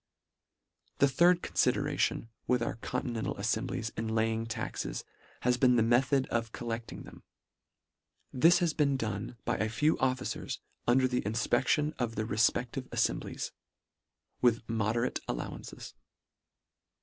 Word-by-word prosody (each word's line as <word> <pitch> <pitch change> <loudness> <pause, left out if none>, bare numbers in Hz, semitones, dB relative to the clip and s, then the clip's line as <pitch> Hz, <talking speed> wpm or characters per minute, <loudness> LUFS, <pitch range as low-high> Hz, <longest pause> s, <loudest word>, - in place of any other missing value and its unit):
The 140 - +5
third 170 +6 +4
confideration 115 - +1 0.2
with 125 -1 +2
our 115 - -3
conti 115 - -3
nental 115 -2 -3
aifemblies 115 +2 -1
in 110 0 -3
laying 110 0 0
taxes 115 - -4 0.4
has 125 0 +2
been 125 -1 +5
the 115 - +4
method 130 +3 +3
of 115 -1 -1
collecting 115 -1 -5
them. - - -13 1.1
This 165 +7 +6
has 175 -3 +1
been 140 -3 +2
done 110 0 -4
by - - 0
a 110 +2 0
few 150 +8 +2
officers 130 -1 -1 0.3
under 130 +2 +4
the 125 -1 0
infpec 110 +3 0
tion 150 0 +2
of 115 -2 -1
the 110 - -1
refpeftive 115 +4 0
aifemblies, - - -1 0.9
with 120 -2 +2
mode 110 -1 0
rate 120 +1 0
allowances. - - -6
120 Hz, 135 wpm, -31 LUFS, 110-130 Hz, 1.1 s, This